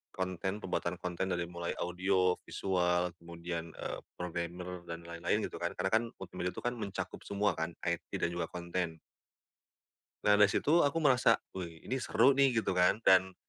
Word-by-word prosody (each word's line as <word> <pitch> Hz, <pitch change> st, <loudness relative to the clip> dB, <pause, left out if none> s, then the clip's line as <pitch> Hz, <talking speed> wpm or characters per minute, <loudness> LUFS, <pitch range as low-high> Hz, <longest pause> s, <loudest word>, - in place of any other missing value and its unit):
konten 95 Hz, +2 st, -2 dB
pembuatan 90 Hz, -1 st, -1 dB
konten 90 Hz, +1 st, -1 dB
dari 90 Hz, 0 st, 0 dB
mulai 85 Hz, 0 st, -4 dB
audio, 90 Hz, +1 st, +2 dB
visual, 90 Hz, -2 st, +1 dB
kemudian, 85 Hz, -1 st, -6 dB
eee, -, -, -4 dB, 0.2 s
programmer 90 Hz, +1 st, -4 dB
dan 85 Hz, 0 st, -5 dB
lain-lain 85 Hz, 0 st, -1 dB
gitu -, -, -8 dB
kan. -, -, -1 dB
Karena 95 Hz, -, 0 dB
kan 110 Hz, +2 st, +4 dB, 0.2 s
multimedia 90 Hz, -1 st, -4 dB
itu -, -, -7 dB
kan 120 Hz, -, +1 dB
mencakup 100 Hz, -4 st, -4 dB
semua 100 Hz, +1 st, +2 dB
kan, 80 Hz, +1 st, -3 dB
IT 85 Hz, -1 st, -2 dB
dan 85 Hz, -, +3 dB
juga 85 Hz, -1 st, -2 dB
konten. 85 Hz, -1 st, -2 dB, 1.3 s
Nah 105 Hz, 0 st, +5 dB
dari 105 Hz, -, +8 dB
situ 160 Hz, +10 st, +3 dB
aku 145 Hz, +2 st, +2 dB
merasa, 125 Hz, -5 st, +5 dB, 0.2 s
"Wih, 85 Hz, -3 st, -7 dB
ini 130 Hz, 0 st, -2 dB
seru 125 Hz, +4 st, +4 dB
nih," 135 Hz, -3 st, +3 dB
gitu -, -, 0 dB
kan. 90 Hz, +5 st, +3 dB
Dan 95 Hz, 0 st, +5 dB
90 Hz, 170 wpm, -33 LUFS, 85-100 Hz, 1.3 s, dari